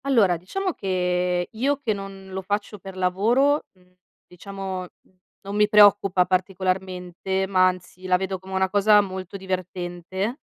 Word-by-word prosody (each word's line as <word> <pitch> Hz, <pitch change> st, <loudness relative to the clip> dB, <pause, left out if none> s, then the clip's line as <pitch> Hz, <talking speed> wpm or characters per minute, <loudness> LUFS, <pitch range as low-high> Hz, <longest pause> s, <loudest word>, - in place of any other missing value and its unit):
Allora, 225 Hz, -10 st, +4 dB
diciamo 370 Hz, -, -3 dB
che 180 Hz, -3 st, 0 dB
io 270 Hz, +6 st, 0 dB
che 255 Hz, -6 st, -1 dB
non 195 Hz, -1 st, -8 dB
lo 190 Hz, 0 st, -4 dB
faccio 205 Hz, +2 st, -3 dB
per 190 Hz, 0 st, -10 dB
lavoro, 230 Hz, +11 st, +2 dB
mhmm, 180 Hz, -1 st, -28 dB, 0.3 s
diciamo, 190 Hz, +1 st, -6 dB
mhmm, 185 Hz, +1 st, -15 dB, 0.3 s
non 200 Hz, +1 st, -6 dB
mi 210 Hz, 0 st, +4 dB
preoccupa 205 Hz, -3 st, +5 dB
particolarmente, 185 Hz, 0 st, -2 dB
ma 185 Hz, -1 st, +4 dB
anzi 185 Hz, 0 st, -5 dB
la 180 Hz, 0 st, +4 dB
vedo 190 Hz, 0 st, -3 dB
come 190 Hz, +1 st, -10 dB
una 190 Hz, 0 st, +2 dB
cosa 205 Hz, +2 st, +5 dB
molto 190 Hz, -1 st, -6 dB
divertente, 185 Hz, -, -4 dB
190 Hz, 150 wpm, -24 LUFS, 185-205 Hz, 0.3 s, preoccupa